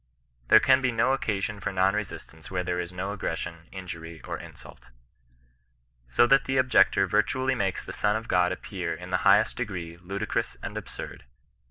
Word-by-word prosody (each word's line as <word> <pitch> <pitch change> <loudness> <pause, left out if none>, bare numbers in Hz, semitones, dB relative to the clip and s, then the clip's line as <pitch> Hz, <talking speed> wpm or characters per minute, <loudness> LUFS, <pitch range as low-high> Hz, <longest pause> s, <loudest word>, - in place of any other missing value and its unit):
There 110 - +8
can 135 +2 +4
be 125 -2 +1
no 115 +3 +2
occasion 105 -5 -2
for 100 - -3
non 95 +1 +3
resistance 95 -6 -6
where 90 -1 -1
there 90 0 -1
is 85 0 -4
no 95 +2 -4
aggression, 85 -4 -4
injury, 85 -3 -8
or - - -4
insult. - - -12 1.2
So 60 - +4
that 135 +2 +4
the 135 0 0
objector 130 -6 +4
virtually 130 +7 +1
makes 95 -7 -1
the - - -7
Son 105 0 +1
of 110 +1 -3
Ood 90 -3 +2
appear 95 - -4
in - - -9
the - - +3
highest - - +4
degree 90 -8 -4
ludicrous 100 +4 -3
and - - -5
absurd. - - -7
95 Hz, 175 wpm, -27 LUFS, 90-110 Hz, 1.2 s, There